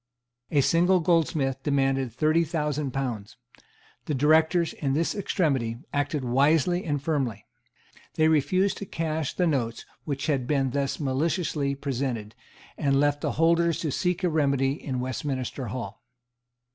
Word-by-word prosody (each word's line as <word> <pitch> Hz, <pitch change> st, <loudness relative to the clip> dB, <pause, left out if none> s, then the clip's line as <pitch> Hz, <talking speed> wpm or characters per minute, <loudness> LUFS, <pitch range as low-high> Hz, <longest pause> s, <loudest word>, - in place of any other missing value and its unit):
A 145 Hz, -, +3 dB
single 175 Hz, +6 st, +3 dB
goldsmith 155 Hz, -6 st, +1 dB
demanded 135 Hz, -3 st, +1 dB
thirty 155 Hz, +7 st, +2 dB
thousand 150 Hz, -3 st, -2 dB
pounds. 125 Hz, -5 st, -4 dB, 0.7 s
The 155 Hz, -6 st, -1 dB
Directors, 160 Hz, +4 st, +3 dB
in 135 Hz, -2 st, -2 dB
this 165 Hz, +4 st, +1 dB
extremity, 140 Hz, -, 0 dB, 0.2 s
acted 145 Hz, -1 st, -1 dB
wisely 150 Hz, +8 st, +2 dB
and 145 Hz, -3 st, -1 dB
firmly. 135 Hz, -, -2 dB, 0.7 s
They 155 Hz, -, +3 dB
refused 160 Hz, +6 st, +2 dB
to 200 Hz, -, -6 dB
cash 160 Hz, -4 st, -2 dB
the 180 Hz, -, +1 dB
notes 120 Hz, -8 st, -1 dB, 0.2 s
which 140 Hz, -3 st, -3 dB
had 135 Hz, -5 st, 0 dB
been 135 Hz, -3 st, +1 dB
thus 140 Hz, 0 st, -1 dB
maliciously 145 Hz, 0 st, -1 dB
presented, 125 Hz, -6 st, -3 dB, 0.5 s
and 140 Hz, -1 st, +2 dB
left 145 Hz, 0 st, +1 dB
the -, -, -1 dB
holders 165 Hz, +1 st, +3 dB
to 155 Hz, -, -1 dB
seek 180 Hz, +5 st, -1 dB
a 180 Hz, -, +3 dB
remedy 140 Hz, -4 st, +2 dB
in 135 Hz, -3 st, -4 dB
Westminster 130 Hz, 0 st, -3 dB
Hall. 110 Hz, -2 st, -6 dB
145 Hz, 140 wpm, -26 LUFS, 135-160 Hz, 0.7 s, A